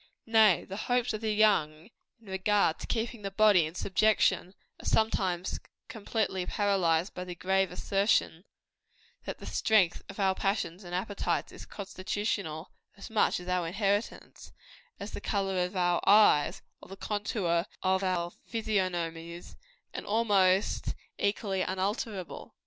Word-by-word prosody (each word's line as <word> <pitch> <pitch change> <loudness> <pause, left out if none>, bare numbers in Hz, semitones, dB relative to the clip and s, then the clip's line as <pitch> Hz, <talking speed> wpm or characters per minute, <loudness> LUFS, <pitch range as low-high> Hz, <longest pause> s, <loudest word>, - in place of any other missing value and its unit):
Nay, 220 -5 +4
the 195 - -7
hopes 245 -1 +1
of 215 - -4
the 220 -1 0
young, 205 -5 +2 0.3
in 230 - -23
regard 190 -2 +1
to - - -7
keeping 230 -1 -2
the 200 - -3
body 195 -5 +4
in 160 - -10
subjection, 195 -1 +2 0.3
are - - -14
sometimes 185 -5 0 0.3
completely 215 -3 -2
paralyzed 185 -4 +1
by 180 - -5
the 180 -1 -7
grave 190 +1 +1
assertion, 195 -2 +1 0.8
that - - -5
the - - -11
strength 205 -6 +2
of 195 - -9
our 190 -1 +3
passions 195 -2 -2
and 175 0 -6
appetites 200 +2 -2
is - - -11
constitutional 190 -4 -4 0.3
as 200 - -10
much 220 - +2
our 180 -1 -1
inheritance, 200 +4 -2 0.5
as 200 +2 -6
the - - -6
color 195 -3 0
of 180 +2 -5
our 175 -1 +1
eyes, 205 -8 +5 0.2
or - - -14
the 195 - -9
contour 200 -4 -1 0.2
of 190 0 +2
our 175 -2 -1 0.2
physiognomies, 175 -6 -3 0.4
and - - -6
almost 200 -3 +2 0.2
equally 200 -2 0
unalterable. 190 +1 -3
195 Hz, 140 wpm, -29 LUFS, 180-210 Hz, 0.8 s, eyes